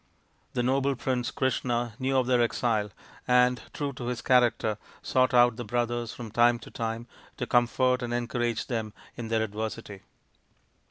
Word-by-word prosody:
The 125 - 0
noble 135 +2 +1
prince 125 0 -1
Krishna 120 -3 -1
knew 135 0 +1
of 130 - +3
their 125 -1 +3
exile, 115 -3 +1 0.4
and, 125 0 +4
true 145 -2 -3
to 125 -1 -7
his 120 -2 -3
character, 120 -4 +3 0.2
sought 130 -1 +2
out 120 -2 +5
the 120 - -4
brothers 120 +1 -1
from 115 -3 -8
time 120 +2 +4
to - - -13
time 115 0 -3 0.3
to - - -2
comfort 125 +1 +2
and 120 -1 -3
encourage 120 -1 -1
them 110 -4 -3 0.2
in 120 -2 -5
their 110 0 +1
adversity. 110 -1 -5
120 Hz, 160 wpm, -28 LUFS, 115-125 Hz, 0.4 s, out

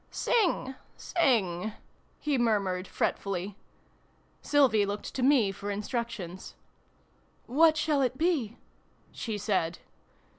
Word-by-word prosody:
" - - -37
Sing, 385 - +1 0.2
sing! 215 - +1 0.2
" - - -37
he 295 -1 0
murmured 200 -6 +1
fret - - -1
fully. 195 0 -4 0.9
Sylvie 260 -8 +4
looked 205 +1 -4
to 260 - -3
me 250 -6 +4
for 200 +1 -6
instructions. 210 -4 -4 0.5
" - - -37
What 315 +5 +4
shall 305 -3 +1
it 255 -1 0
be? 295 -9 0 0.3
" - - -35
she 220 -3 -4
said. 185 -5 0
225 Hz, 125 wpm, -29 LUFS, 200-275 Hz, 0.9 s, Sylvie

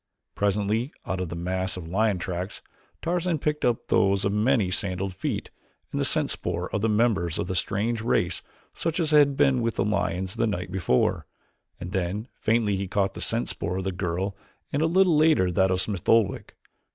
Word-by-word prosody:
Presently 105 +5 0
out 95 +1 -2
of 90 - -3
the 85 - -5
mass 95 +2 -2
of 85 -3 -7
lion 100 +3 +1
tracks, 90 +2 -5 0.4
Tarzan 175 0 0
picked 150 0 -2
up 120 -2 +1
those 100 -1 +3
of 100 - +1
many 105 -2 +2
sandaled 95 0 -1
feet 95 - -3 0.4
and - - -1
the - - +1
scent - - +2
spoor 90 +1 -3
of 105 - 0
the 115 - +2
members 105 -7 +1
of - - -1
the 95 - -3
strange 105 +6 0
race 90 -6 0 0.3
such 165 +1 -2
as 160 -3 +1
had 145 -2 +5
been 130 -3 +3
with 115 -2 -1
the 95 - 0
lions 95 0 -1
the 115 - +2
night 90 -3 -3
before, 90 -10 +1 0.5
and 90 0 -6
then 95 +4 -2
faintly 110 -2 +1
he 95 0 -3
caught 95 +1 0
the - - -8
scent - - -1
spoor 90 - -3
of 95 - -2
the 95 - -1
girl 95 +2 -2 0.4
and 145 - +1
a 160 - +3
little 180 0 +4
later 150 - +4
that 95 +1 +3
of 95 0 +1
Smith 100 -5 -3
Oldwick. 115 -4 +2
100 Hz, 200 wpm, -26 LUFS, 90-115 Hz, 0.5 s, had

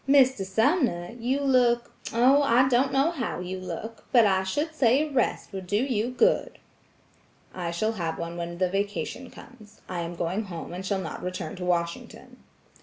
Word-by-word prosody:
"Mr. 265 -6 +5
Sumner, 220 - +1
you 260 +4 0
look–oh, 250 0 +3
I 260 -1 +4
don't 260 +2 +3
know 275 +5 +2
how 265 - -3
you 185 +1 -5
look, 185 +5 -7
but 235 -4 +6
I 190 -2 +3
should 295 - -2
say 275 +1 +3
a - - -10
rest 250 -5 -1
would 190 -2 -6
do 205 +3 +1
you 240 -2 0
good." 455 - +1 1.0
"I 175 -2 -3
shall 195 +6 0
have 170 -7 -3
one 170 0 -5
when 170 0 -5
the 185 +1 +2
vacation 205 +6 -3
comes. 220 -4 -15
I 180 -2 -4
am 170 0 -4
going 180 +6 -2
home 170 -3 -7
and - - -5
I - - -5
shall 195 -1 0
not 160 -4 -6
return 180 -3 -5
to 180 - -5
Washington." 170 -1 -3
215 Hz, 180 wpm, -26 LUFS, 180-255 Hz, 1.0 s, but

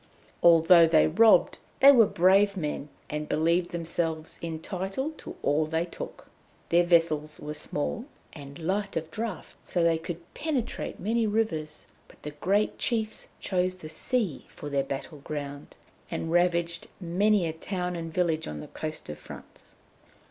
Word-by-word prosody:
Although 170 0 +7
they 160 -1 +5
robbed, 220 +7 +5 0.2
they 275 +1 +9
were 235 -6 +6
brave 195 +3 +4
men, 150 -3 -3 0.2
and 150 0 -4
believed 170 +3 +2
themselves 165 -1 -3
entitled 190 - -4
to - - -8
all 150 +2 +2
they 160 +2 0
took. 175 - -9 0.4
Their 175 +1 +4
vessels 155 -3 +2
were 150 0 -5
small, 150 - -3 0.3
and 140 -2 -10
light 195 +3 -2
of 160 0 -4
draught, 220 +3 -5
so 175 - -1
they 165 -1 +3
could 170 +1 -8
penetrate 290 -7 -3
many 225 +3 +1
rivers, 165 -9 -1 0.2
but - - -19
the 150 - -5
great 195 +8 0
chiefs 220 -3 -1
chose 185 -1 0
the 160 -4 -10
sea 195 - -2
for 145 - -8
their 140 -1 +1
battle 140 +3 -6
ground, 145 0 -6 0.3
and 165 - -3
ravaged 170 -1 +1
many 195 +2 +2
a 160 - -2
town 180 +2 -3
and 165 -1 -5
village 165 -2 0
on 75 -1 -5
the - - -9
coast 155 0 -6
of 75 - -7
France. - - -13
170 Hz, 155 wpm, -28 LUFS, 155-195 Hz, 0.4 s, they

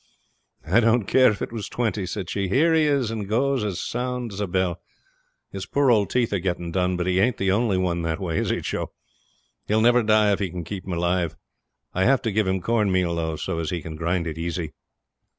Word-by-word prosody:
'I 95 +9 +4
didn't 115 -1 +3
care 130 +4 +5
if 105 - -3
it - - -5
was 115 -3 -5
twenty,' 110 -5 -1
said 95 0 -4
she. 100 +2 -2
'Here 155 - +3
he 160 -1 +4
is, 140 -6 +1
and 105 -3 -4
goes 130 +2 +1
as 100 -4 -2
sound 125 -2 -3
as 95 - -7
a 105 - -1
bell. 90 -1 -1 0.7
His 95 -1 -6
poor 140 -2 +3
old 105 -4 +3
teeth 120 -4 0
are 100 - +1
getting 85 -2 -3
done, 90 0 0
but 90 - -1
he 95 0 +1
ain't 110 +3 +2
the 95 -1 +1
only 105 -1 +2
one 90 -2 0
that 80 +1 -2
way, 85 -5 -1
is - - -1
he, - - 0
Joe? - - -3 0.8
He'll 110 +1 +2
never 120 +2 +5
die 110 -1 +4
if 100 - 0
I 95 - -1
can 90 0 -6
keep 95 +3 -7
him 95 - -3
alive. 85 -1 0 0.6
I 95 +1 +1
have 135 +1 +3
to 115 - 0
give 105 0 +1
him 95 0 0
corn 110 -1 +1
meal, 90 -2 +1
though, 80 -1 -2
so 80 - -3
as 80 - -2
he 90 -2 -2
can 80 -1 -7
grind 85 +2 -1
it 80 -1 -5
easy.' 85 -1 -3
95 Hz, 240 wpm, -24 LUFS, 90-115 Hz, 0.8 s, care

